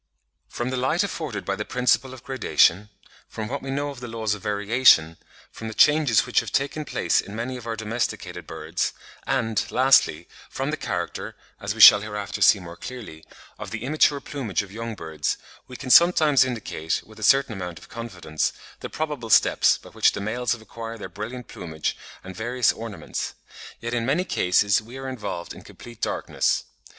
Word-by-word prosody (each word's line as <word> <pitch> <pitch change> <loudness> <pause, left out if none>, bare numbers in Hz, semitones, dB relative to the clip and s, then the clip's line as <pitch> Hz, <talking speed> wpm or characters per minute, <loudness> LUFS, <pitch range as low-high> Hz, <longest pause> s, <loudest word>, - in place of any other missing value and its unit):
From 120 +2 -3
the 130 - -2
light 145 +9 +1
afforded 155 - -4
by 100 - -1
the 105 - -4
principle 125 +2 +1
of 130 -2 -11
gradation—from 105 -4 0
what 140 +4 -4
we 135 - -7
know 145 +1 -2
of 140 - -10
the 120 - -7
laws 110 -2 -2
of 105 - -7
variation—from 105 -2 +1
the 110 - -6
changes 150 -7 +4
which - - +2
have - - -5
taken 140 +2 -1
place - - +1
in 100 - -10
many 120 +3 -3
of 120 -2 -9
our 115 - -2
domesticated 110 +2 -4
birds—and, 90 +8 -3
lastly, 130 - +3 0.2
from 135 +3 -3
the - - 0
character 90 -10 -4 0.2
(as - - -3
we - - -1
shall 105 - +11
hereafter 105 -1 -5
see 105 - +6
more 85 -2 -9
clearly) 110 -9 -9 0.4
of - - -6
the 110 0 -5
immature 145 +1 +3
plumage 115 - -3
of 100 - -13
young 115 +1 -5
birds—we 80 - -5
can 130 - -4
sometimes 155 -3 +6
indicate, 110 -10 -3
with 110 0 -15
a - - -7
certain 135 +2 +4
amount 90 -4 -6
of - - -13
confidence, 95 -9 -3 0.3
the - - -6
probable 150 -7 -4
steps - - +5
by - - -15
which - - +3
the - - -4
males 115 +4 -1
have 120 - -8
acquired 115 +1 -8
their 95 - -7
brilliant 110 +7 -7
plumage 80 -2 -4 0.3
and 95 0 -9
various 120 +3 +1
ornaments; 105 -8 -6 0.4
yet 115 +1 -4
in 120 -1 0
many 140 +9 +1
cases 100 - +2
we 115 +4 -11
are 135 0 -6
involved 105 -9 -5
in - - -12
complete 120 -2 -13
darkness. - - 0
115 Hz, 180 wpm, -24 LUFS, 100-130 Hz, 0.4 s, shall